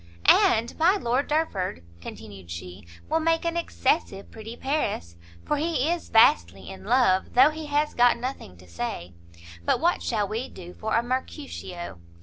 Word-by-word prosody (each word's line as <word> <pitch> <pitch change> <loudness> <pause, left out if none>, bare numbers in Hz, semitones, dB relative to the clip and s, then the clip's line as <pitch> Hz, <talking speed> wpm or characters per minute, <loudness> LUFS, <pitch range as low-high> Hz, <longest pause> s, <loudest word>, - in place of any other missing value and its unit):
"And 230 +2 +4
my 350 +5 +5
Lord 260 - 0
Derford," 200 - -1 0.2
continued 95 0 -10
she, 90 +2 -8 0.2
"will 320 +1 +1
make 330 +1 +1
an 335 0 -1
excessive 275 -10 -1
pretty 225 +2 -9
Paris, 265 - -2 0.3
for 295 - 0
he 320 -1 0
is 345 -1 -3
vastly 95 - +4
in 190 - -11
love, 215 -5 +2
though 265 +5 +7
he 310 0 -7
has 295 +1 0
got 245 0 +4
nothing 240 - -6
to 90 +1 -17
say; 85 -1 -5 0.5
but - - +1
what 345 +3 +1
shall 210 -4 -1
we 225 +5 -4
do 175 -1 -11
for 220 0 -2
a 230 - +2
Mercutio? 240 - -5
235 Hz, 160 wpm, -26 LUFS, -, 0.5 s, though